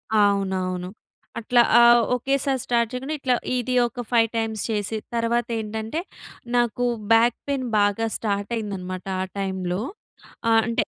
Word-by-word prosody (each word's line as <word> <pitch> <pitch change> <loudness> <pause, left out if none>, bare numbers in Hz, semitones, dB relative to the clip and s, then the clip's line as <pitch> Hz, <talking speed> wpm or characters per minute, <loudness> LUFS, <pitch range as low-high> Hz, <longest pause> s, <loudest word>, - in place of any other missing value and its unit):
అవునవును. 190 -3 +1 0.5
అట్లా 240 +2 +3 0.2
ఆ! - - +7 0.3
ఒకేసారి 270 +1 0
స్టార్ట్ 235 -2 +1
చేయకుండా 265 +5 -4
ఇట్లా 260 -2 +1 0.2
ఇది 250 +1 -2
ఒక 245 0 -6
ఫైవ్ 230 -2 +4
టైమ్స్ 220 -2 -2
చేసి 215 0 -2 0.2
తర్వాత 235 +1 0
ఏంటంటే 220 +6 -4 0.6
నాకు 240 0 +1 0.3
బ్యాక్ 230 +1 +5
పెయిన్ 275 -2 -1
బాగా 205 +2 +2
స్టార్ట్ 205 0 -2
అయిందనమాట 185 -4 -5 0.2
ఆ - - -2
టైమ్‌లో. 190 -1 -2 0.7
ఆహ్, 225 0 +5
అంటే 230 - +1
225 Hz, 130 wpm, -24 LUFS, 200-240 Hz, 0.7 s, ఆ